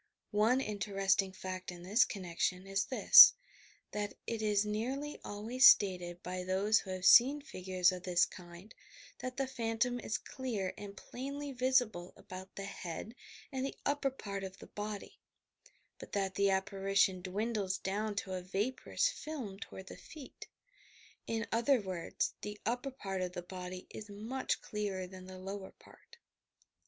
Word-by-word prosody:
One 225 +5 +4
interesting 195 -3 0
fact 185 -1 -6
in 175 -1 -10
this 210 +7 +4
connection 185 -1 -2
is 195 +1 0
this: 470 - +10 0.6
that 205 -1 -3
it 230 -1 -3
is 210 -1 +2
nearly 260 +8 -3
alwaj's 230 +6 +4
stated 180 -3 +4
by 180 0 -4
those 195 +4 +3
who 190 - -10
have 185 -1 -4
seen 270 +9 +8
figures 185 - +1
of 180 -1 -6
this 180 -1 +3
bind 175 +3 -12 0.5
that 255 0 -5
the 270 - +1
phantom 245 -1 -1
is 220 - -2
clear 220 -8 -4
and 200 -1 -9
plainly 280 +6 -6
visible 250 -8 +1
about 185 +1 -10
the 195 - -5
head 195 +2 -6 0.4
and 260 -2 -2
the 275 - -3
upper 285 -1 +1
part 200 -7 -6
of 190 0 -7
the - - -11
body, 210 -1 -6 0.8
but - - -11
that 195 -2 0
the 200 0 +2
apparition 195 -1 +2
dwindles 200 +1 -1
down 205 +2 -2
to 195 -1 -3
a 185 - -3
vaporous 210 - 0
film 290 - -5
toward 190 -3 -9
the - - -9
feet. 295 -5 -11 0.8
In 225 -1 -1
other 235 +4 +3
words, 185 -4 -3
the 210 0 -6
upper 245 +5 -1
part 195 -8 -4
of 180 -1 -3
the 175 - -5
body 180 0 -7
is 210 -1 -8
much 225 +6 -3
clearer 200 -3 -3
than 185 0 -11
the 185 0 -9
lower 195 +1 -6
part. 470 - -19
205 Hz, 155 wpm, -34 LUFS, 185-240 Hz, 0.8 s, this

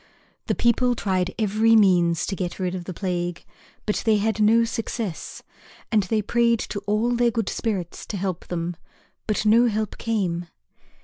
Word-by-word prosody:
The - - +1
people 245 +1 +2
tried 185 -4 0
every 220 +1 +3
means 175 -6 +4
to 195 - -3
get 180 -2 -4
rid 185 -2 -2
of 180 -2 -5
the 185 - -5
plague, 175 -2 -3 0.4
but 210 - 0
they 220 -2 +3
had 220 +2 0
no 225 +2 +5
success. 225 -4 -4 0.5
And 215 -2 +4
they 210 +3 -1
prayed 235 +2 +2
to 205 - -2
all 215 +4 +1
their 240 0 +3
good 225 -3 -1
spirits 195 -7 -3
to 205 - -4
help 185 -2 -3
them, 175 0 -3 0.5
but 215 0 0
no 230 +3 +5
help 215 -2 -2
came. 185 -7 -1
210 Hz, 170 wpm, -24 LUFS, 180-225 Hz, 0.5 s, no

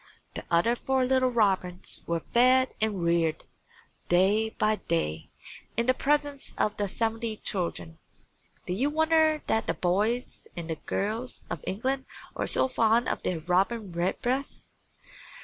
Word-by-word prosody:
The - - -6
other 175 +8 +3
four 265 +1 0
little 260 0 +3
robins 190 -6 +1
were 170 -1 -1
fed 255 +5 +3
and 210 -5 0
reared, 170 -2 +1 0.7
day 200 +5 +3
by 215 0 0
day, 80 - -2 0.5
in 235 - +2
the 255 - +4
presence 290 +1 -1
of 210 - +1
the 205 - 0
seventy 225 +1 -2
children. 90 - -4 0.7
Do 180 - -2
you 260 +10 +1
wonder 315 0 +3
that 225 - 0
the 165 - 0
boys 210 +9 -1
and 165 -1 -3
girls 220 +5 -2
of 170 -4 -4
England 260 +7 -2 0.3
are - - -2
so - - +3
fond 230 -1 +2
of - - -2
their 170 -3 -2
Robin 190 +4 0
Redbreast? 240 +10 -2
220 Hz, 140 wpm, -28 LUFS, 180-255 Hz, 0.7 s, the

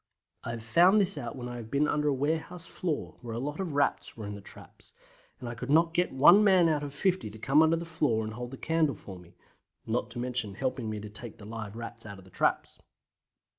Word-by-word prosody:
I - - -5
have 115 -1 -5
found 175 - +5
this 195 -1 +3
out 120 -1 -5
when 125 -2 -6
I 120 0 -6
have 115 -2 -8
been 145 +3 +2
under 150 0 0
a 145 - +3
warehouse 160 +5 -2
floor, 170 -2 -4
where 115 -2 -6
a - - -2
lot 145 +5 -4
of 180 -6 -3
Rats 145 -3 +1
were 110 - -6
in 105 - -5
the 100 - -8
traps, - - -8 0.5
and 125 - -7
I 120 - -4
could 125 +3 -7
not 165 +3 +4
get 175 +1 +1
one 170 +10 +7
man 190 -4 +5
out 155 -2 +1
of 145 -1 -5
50 180 - 0
to 105 - -11
come 135 +7 +4
under 160 +1 +4
the 165 +1 -4
floor 140 -9 0
and 110 0 -5
hold 120 +2 -6
the 135 - -9
candle 160 -4 +1
for 95 -1 -10
me, 85 -1 -18 0.5
not 115 +1 -1
to 120 - -10
mention 120 -5 -2
helping 130 -1 -2
me 110 -1 -4
to 105 0 -8
take 110 +1 -9
the 100 - -12
live 110 -1 -7
Rats 115 -1 -8
out 100 -1 -8
of 95 - -14
the 95 - -18
traps. - - 0
130 Hz, 250 wpm, -29 LUFS, 110-160 Hz, 0.5 s, one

